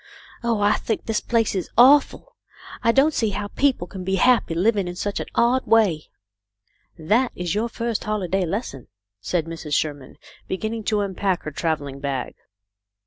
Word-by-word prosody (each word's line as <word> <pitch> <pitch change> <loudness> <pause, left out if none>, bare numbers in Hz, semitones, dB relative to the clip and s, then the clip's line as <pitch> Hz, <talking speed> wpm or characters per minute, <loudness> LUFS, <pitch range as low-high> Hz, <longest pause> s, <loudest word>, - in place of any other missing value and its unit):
Oh, 230 -3 0
I 205 0 +3
think 220 - -3
this 225 -1 0
place 230 -2 +1
is 185 -3 -3
awful! 285 - +4 0.5
I 230 - +3
don't 275 +6 +3
see 225 -5 +1
how 205 0 -4
people 265 -9 +1
can 185 +1 -8
be 190 +1 0
happy, 235 -5 +3
living 200 +1 +1
in 175 - -5
such 200 +2 -3
an - - -5
odd 245 +2 +2
way." 205 -9 +3 0.9
"That 220 +11 +1
is 175 -1 -3
your 220 +3 -1
first 230 -1 -3
holiday 195 -3 -1
lesson," 165 - -5 0.3
said 160 - -1
Mrs. 165 -3 -4
Sherman, 145 -4 -3 0.3
beginning 220 +3 -4
to 210 -1 +1
unpack 190 -2 -1
her 155 - -5
travelling 145 -3 -3
bag. 135 -2 -3
205 Hz, 165 wpm, -23 LUFS, 165-230 Hz, 0.9 s, awful